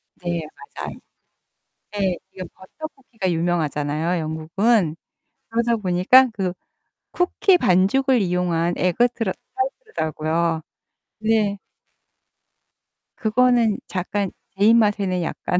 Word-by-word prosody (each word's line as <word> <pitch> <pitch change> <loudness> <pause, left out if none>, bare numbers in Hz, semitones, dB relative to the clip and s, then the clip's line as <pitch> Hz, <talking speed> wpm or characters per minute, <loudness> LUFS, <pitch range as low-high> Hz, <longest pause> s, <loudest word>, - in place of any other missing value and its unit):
네 175 -2 -3 0.3
맞아요. - - -6 0.9
네. 195 -4 0
이게 185 - -7
버터 310 +12 -9
쿠키가 225 -9 -4
유명하잖아요, 165 0 0
영국은. 165 +3 +1 0.5
그러다 235 +1 +1
보니까 205 +7 +5
그 185 -3 -1 0.6
쿠키 360 +1 +3
반죽을 240 - +3
이용한 175 -2 0
에그 185 +7 +2
트라 225 -5 -2 0.2
타르트라고요. 165 - -2 0.6
네. 215 -2 +1 1.6
그거는 235 -1 +2
약간 195 +1 -2 0.3
제 200 - +3
입맛에는 205 -5 +3
약간. 180 +2 -2
190 Hz, 225 characters per minute, -22 LUFS, 175-230 Hz, 1.6 s, 보니까